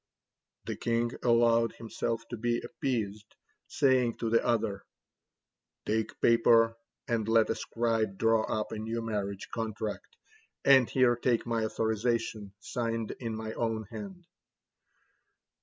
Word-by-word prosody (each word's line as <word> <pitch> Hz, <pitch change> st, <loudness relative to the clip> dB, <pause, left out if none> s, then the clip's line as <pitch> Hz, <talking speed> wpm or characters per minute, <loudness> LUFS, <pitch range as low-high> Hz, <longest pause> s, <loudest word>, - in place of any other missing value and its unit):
The -, -, -3 dB
king 115 Hz, 0 st, 0 dB
allowed 115 Hz, -1 st, +3 dB
himself 115 Hz, 0 st, -4 dB
to -, -, -4 dB
be 120 Hz, +1 st, 0 dB
appeased, 105 Hz, -5 st, -3 dB, 0.3 s
saying 130 Hz, -4 st, +2 dB
to 115 Hz, -2 st, -2 dB
the 115 Hz, -, +4 dB
other: 105 Hz, -4 st, 0 dB, 1.0 s
"Take 110 Hz, +1 st, -1 dB
paper 115 Hz, -1 st, +5 dB, 0.3 s
and 115 Hz, -2 st, 0 dB
let 115 Hz, -1 st, +4 dB
a -, -, +2 dB
scribe 115 Hz, -4 st, -1 dB
draw 115 Hz, 0 st, +3 dB
up 110 Hz, -, -2 dB
a 110 Hz, -, -4 dB
new 115 Hz, +1 st, -3 dB
marriage 100 Hz, -3 st, -3 dB
contract, 110 Hz, -, -4 dB, 0.5 s
and 135 Hz, -3 st, +6 dB
here 125 Hz, -2 st, +4 dB
take 120 Hz, -1 st, 0 dB
my 115 Hz, -2 st, 0 dB
authorization, 110 Hz, -1 st, -1 dB
signed 115 Hz, 0 st, -3 dB
in 115 Hz, -3 st, -4 dB
my 110 Hz, 0 st, -5 dB
own 115 Hz, -1 st, -1 dB
hand." 190 Hz, -4 st, -8 dB
115 Hz, 125 wpm, -30 LUFS, 110-120 Hz, 1.0 s, and